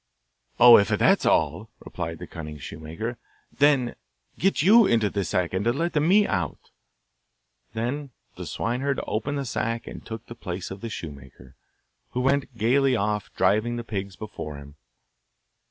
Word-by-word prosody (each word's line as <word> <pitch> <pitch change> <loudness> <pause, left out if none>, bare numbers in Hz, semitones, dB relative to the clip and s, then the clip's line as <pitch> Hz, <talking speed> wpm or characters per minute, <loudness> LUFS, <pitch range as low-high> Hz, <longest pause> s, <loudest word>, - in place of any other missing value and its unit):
'Oh, 120 -2 +10
if 100 - +2
that's - - +3
all!' - - +1 0.2
replied - - -5
the - - -8
cunning 75 -2 -8
shoemaker, 80 - -6 0.4
'get 145 +5 0
you 215 +3 +7
into 110 -3 +2
this 100 -4 -2
sack, 90 -1 0
and 95 +2 0
let 140 +10 0
me 195 +7 +5
out.' 90 - -3 1.0
Then 135 +6 -3 0.3
the - - -7
swineherd 130 +4 -1
opened 140 +7 -2
the 140 - -3
sack 115 -1 -2
and - - -9
took 115 0 -8
the - - -9
place 95 -6 -6
of 95 +1 -8
the 115 - -5
shoemaker, 70 - -10 0.6
who 125 - -1
went 135 -2 0
gaily 130 +4 +3
off, 105 -1 -1
driving 110 +4 +2
the 120 - -4
pigs 100 -4 -5
before 85 -9 -7
him. 70 0 -12
115 Hz, 150 wpm, -25 LUFS, 95-135 Hz, 1.0 s, Oh